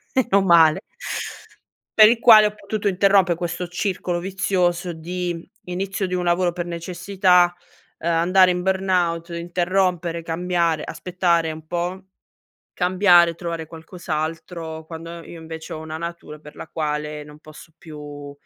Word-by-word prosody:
Meno 205 -6 +3
male. 170 -1 +6 1.2
Per 215 -1 +9
il 230 0 +2
quale 220 -3 +8
ho 210 - -5
potuto 210 0 -2
interrompe 195 -2 +3
questo 175 +1 -4
circolo 180 -1 -2
vizioso 180 -1 0
di: 175 +1 -5 0.2
inizio 190 +2 -3
di 185 - -5
un 180 -1 -1
lavoro 175 +1 +2
per 175 0 -4
necessità, 180 +1 +2 0.4
ehm, 170 +1 -1
andare 180 +3 +4
in 180 0 -2
burnout, 180 -3 0
interrompere, 175 0 -1
cambiare, 165 -1 -1
aspettare 170 -3 0
un 155 0 -11
po', 175 +3 -3 0.7
cambiare, 180 -2 +4
trovare 170 -1 -5
qualcos'altro, 160 0 -5
quando 165 +1 -8
io 170 - -10
invece 160 0 -8
ho 155 - -6
una 160 0 -6
natura 170 -2 -7
per 150 0 -14
la - - -9
quale 150 -1 -3
non 150 0 -14
posso 155 +1 -14
più 145 -3 -10
175 Hz, 135 wpm, -22 LUFS, 165-185 Hz, 1.2 s, Per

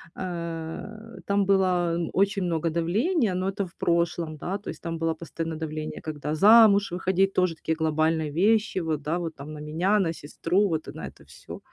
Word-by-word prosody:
э, 175 +6 -6
там 200 0 +2
было 180 -3 +2 0.2
очень 195 0 +1
много 165 -2 0
давления, 205 - +1
но 185 +1 -1
это 195 0 -2
в 175 - -15
прошлом, 170 -2 0
да, 185 +6 -3
то 200 - -15
есть - - -7
там 165 -1 -4
было 165 0 0
постоянно 165 0 -5
давление, 155 -1 -5
когда 150 -1 -4
замуж 205 +1 +6
выходить, 190 +2 +1
тоже 180 -3 +1
такие 160 0 -2
глобальные 160 0 +1
вещи, 210 +6 +2
вот, 160 -4 -2
да, 155 +4 -1
вот 165 -2 -4
там 145 +2 -9
на 150 - -8
меня, 165 +7 +1
на 170 -4 0
сестру, 170 +6 0
вот, 160 -2 -2
а, - - -6
на - - -7
это - - -15
всё. - - -11
170 Hz, 190 wpm, -26 LUFS, 160-195 Hz, 0.2 s, замуж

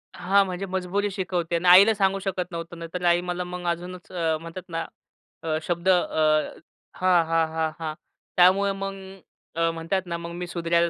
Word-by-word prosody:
हां, 195 +2 +3
म्हणजे 185 +1 -4
मजबुरी 190 +2 -1
शिकवते 180 -3 -2
आणि 170 +2 -1
आईला 195 +5 +8
सांगू 195 -1 +1
शकत 185 -2 -3
नव्हतो, 170 0 -6
नाही 165 -1 -8
तर 180 0 -4
आई 175 0 +4
मला 180 0 -3
मग 180 0 -7
अजूनच 175 +1 -4
अ, 165 -3 0
म्हणतात 165 +2 -8
ना 165 0 -3 0.8
शब्द 175 +1 -1
अ - - +7 1.0
हां, 180 -2 +3
हां, 165 0 +2
हां, 160 -1 0
हां. 155 -1 -3 0.4
त्यामुळे 190 +3 +5
मग 195 0 -4 0.6
अ, 165 0 +2
म्हणतात 165 +4 -2
ना 170 - -3
मग 170 0 -7
मी 180 0 -5
सुधारायला 170 0 +1
180 Hz, 175 wpm, -25 LUFS, 170-185 Hz, 1.0 s, आईला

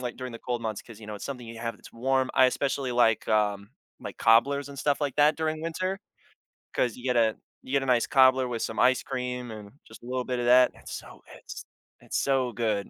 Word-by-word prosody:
like, 125 -1 -5
during 130 -1 -6
the 115 - -8
cold 120 -1 -3
months 110 -2 -3
'cause, 115 -2 -14
you 105 - -11
know, 105 - -6
it's - - -8
something 125 -4 -6
you 115 0 -9
have 115 0 -4
that's - - -15
warm. 130 +2 0
I 130 - +6
especially 135 0 -1
like, 115 -3 +3
um, 105 -1 +1 0.3
my - - -7
cobblers 140 +5 +3
and 140 -1 -10
stuff 145 0 0
like 145 -3 -2
that 150 +1 +4
during 155 -1 -2
winter 185 +4 -3 0.8
'cause 120 -4 0
you 125 - -12
get 125 -2 +1
a 110 -2 +3 0.3
you 130 - -8
get 140 -1 +2
a - - -3
nice 125 -2 +2
cobbler 130 -1 +5
with 120 -2 -4
some 115 - -3
ice 130 +1 +4
cream 125 -2 -4
and 105 -2 -10
just - - -14
a - - -14
little 125 0 -2
bit 125 0 -3
of 120 - -1
that. 125 +1 +6
It's - - -10
so - - -9
it's - - -10 0.3
it's - - -4
so 130 -3 +1
good, 105 -3 -1
125 Hz, 240 wpm, -27 LUFS, 115-135 Hz, 0.8 s, I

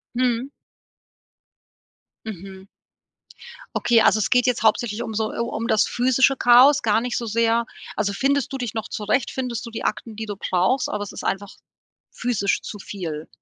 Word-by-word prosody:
Mhm. 250 +1 0 1.8
Mhm. 195 -2 -9 1.1
Okay, 230 -2 +3
also 215 - +4
es - - 0
geht 250 0 +4
jetzt 240 -3 0
hauptsächlich 220 +1 +1
um 220 - -6
so 215 0 -1
äh, - - -8
um 230 -1 -2
das 215 - +3
physische 260 +2 +3
Chaos, 255 +4 +6
gar 220 0 +2
nicht 245 0 -2
so 235 - -3
sehr. 230 +1 +2 0.3
Also, 205 -1 -1
findest 275 +3 0
du 270 - -3
dich 245 -4 -4
noch 220 -1 -4
zurecht? 215 +5 -1
Findest 250 -2 -4
du 235 - -7
die 225 - -6
Akten, 220 +1 -3
die 220 +1 -5
du 205 -1 -5
brauchst? 190 +7 0
Oder 210 - -3
es 205 - -5
ist - - -8
einfach 195 0 -3 0.6
physisch 220 -5 -1
zu 205 - -8
viel? 160 -7 -6
225 Hz, 175 wpm, -23 LUFS, 205-245 Hz, 1.8 s, Chaos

